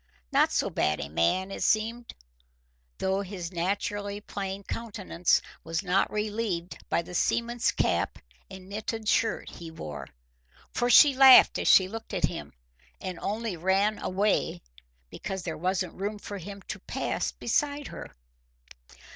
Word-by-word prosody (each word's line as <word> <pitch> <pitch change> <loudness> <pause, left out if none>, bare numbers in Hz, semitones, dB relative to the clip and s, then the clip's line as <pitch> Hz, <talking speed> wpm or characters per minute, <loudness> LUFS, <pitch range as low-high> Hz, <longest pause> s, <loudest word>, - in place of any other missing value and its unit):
Not - - +4
so - - 0
bad 75 0 +1
a 70 - -5
man, 135 - +1
it - - -6
seemed, 230 +2 0 0.8
though 190 +1 0
his 185 -3 -6
naturally 200 +3 -2
plain 195 -1 -5
countenance 200 -6 0 0.2
was 165 +4 -2
not 185 +1 +2
relieved 210 -4 -2
by 170 - +1
the 180 - -10
seaman's 235 +5 +1
cap - - 0 0.3
and 185 -1 -11
knitted 215 +2 -4
shirt 225 +1 +1
he 170 -1 -9
wore. 75 - -7 0.7
For 245 - +1
she 285 +3 +8
laughed 265 -1 +8
as - - -2
she 185 - +7
looked 225 +3 -7
at - - +2
him, - - -6 0.5
and 185 -2 -5
only 215 -1 -2
ran 195 +5 +1
away 200 - 0 0.5
because 190 -2 -5
there 165 - -3
wasn't 185 +2 -1
room 205 +3 -4
for 205 -1 -7
him 195 +2 -9
to - - -6
pass - - -2
beside 290 -1 -1
her. - - -8
195 Hz, 145 wpm, -28 LUFS, 180-215 Hz, 0.8 s, she